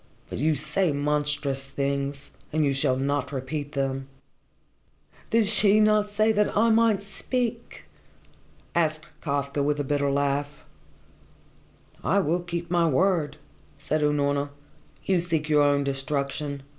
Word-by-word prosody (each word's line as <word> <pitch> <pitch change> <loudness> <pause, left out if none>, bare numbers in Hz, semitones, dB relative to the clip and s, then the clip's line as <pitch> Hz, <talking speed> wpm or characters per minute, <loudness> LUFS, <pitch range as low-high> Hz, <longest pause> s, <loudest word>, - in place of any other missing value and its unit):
But - - -4
you 155 +3 +2
say 155 +5 +1
monstrous 145 -1 -1
things, 140 +1 -3 0.2
and 155 0 +1
you 140 - +2
shall 135 -1 +1
not 140 0 -1
repeat 145 +2 -4
them." 135 -1 -2 1.2
"Did 230 -1 +3
she 210 0 +5
not 215 -1 +3
say 215 +2 +2
that 210 -1 +1
I 225 +2 +4
might 220 -3 +3
speak?" 235 +4 -3 0.9
asked 155 -2 0 0.2
Kafka 140 -1 -1
with 145 +1 0
a - - 0
bitter 145 0 0
laugh. 140 +1 -1 1.4
"I 200 - +2
will 175 -2 +1
keep 170 0 -5
my 170 -1 +3
word," 155 -1 +1 0.4
said 155 0 -1
Unorna. 145 -1 +1 0.6
"You 190 -2 +2
seek 165 -3 -1
your 150 -1 +4
own 145 0 +3
destruction. 140 +1 -3
150 Hz, 130 wpm, -26 LUFS, 140-180 Hz, 1.4 s, she